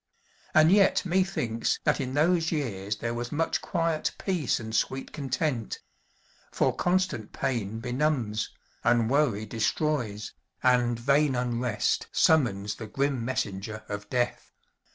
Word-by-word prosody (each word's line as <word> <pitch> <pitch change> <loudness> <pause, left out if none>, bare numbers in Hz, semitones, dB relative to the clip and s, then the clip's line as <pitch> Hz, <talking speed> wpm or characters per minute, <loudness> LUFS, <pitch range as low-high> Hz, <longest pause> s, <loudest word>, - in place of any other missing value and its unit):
And 155 +2 +7
yet 200 -1 +4
methinks 175 -11 0
that - - +2
in 130 0 -3
those 165 +2 +3
years 105 - -2
there 115 +2 -3
was 120 0 -4
much 160 +2 0
quiet 165 -2 -1
peace 175 - 0
and 110 -1 -5
sweet 135 +4 -1
content; 135 -3 -2 0.7
for - - +1
constant 180 - 0
pain 115 -5 -2
benumbs, 125 -3 -1 0.3
and 120 -1 +3
worry 130 -8 +2
destroys, 115 -2 -1 0.3
and 125 -2 +3
vain 140 +3 +2
unrest 120 -2 0
summons 105 -10 +3
the 110 - -7
grim 135 +2 -1
messenger 110 -3 -3
of 105 0 -6
death. 125 -1 -1
125 Hz, 125 wpm, -28 LUFS, 110-150 Hz, 0.7 s, And